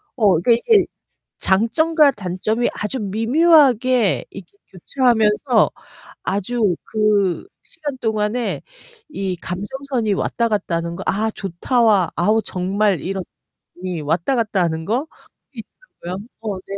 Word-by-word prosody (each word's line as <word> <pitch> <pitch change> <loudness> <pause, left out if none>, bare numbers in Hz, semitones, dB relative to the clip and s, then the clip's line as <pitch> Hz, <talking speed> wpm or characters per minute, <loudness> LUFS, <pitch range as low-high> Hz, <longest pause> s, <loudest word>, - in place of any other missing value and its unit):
어 205 - +3
그러니까 240 - +2
이게 405 - +3 0.5
장점과 290 - +3
단점이 210 +3 -2
아주 210 +5 -3
미묘하게 250 - +3
이렇게 190 -3 -12 0.2
교체하면서 225 - +2 0.5
아주 205 0 0
그 210 - +1 0.2
시간 295 -4 -6
동안에 220 +1 -1 0.5
이 195 -8 -3
감정선이 220 +6 -3
왔다 235 +4 0
갔다 205 -5 -1
하는 170 0 -3
거 - - -6
'아, 220 +3 0
좋다.'와 200 +1 +1
'아우, 215 +5 +2
정말 190 -1 0
이런.'이 190 +2 -6 0.6
왔다 165 - 0
갔다 215 -5 0
하는 160 -1 -2
거 245 - -1 0.5
있더라고요. 210 - -9 0.2
어. 210 -4 -3
네. 195 +1 -7
215 Hz, 260 characters per minute, -20 LUFS, 190-245 Hz, 0.6 s, 어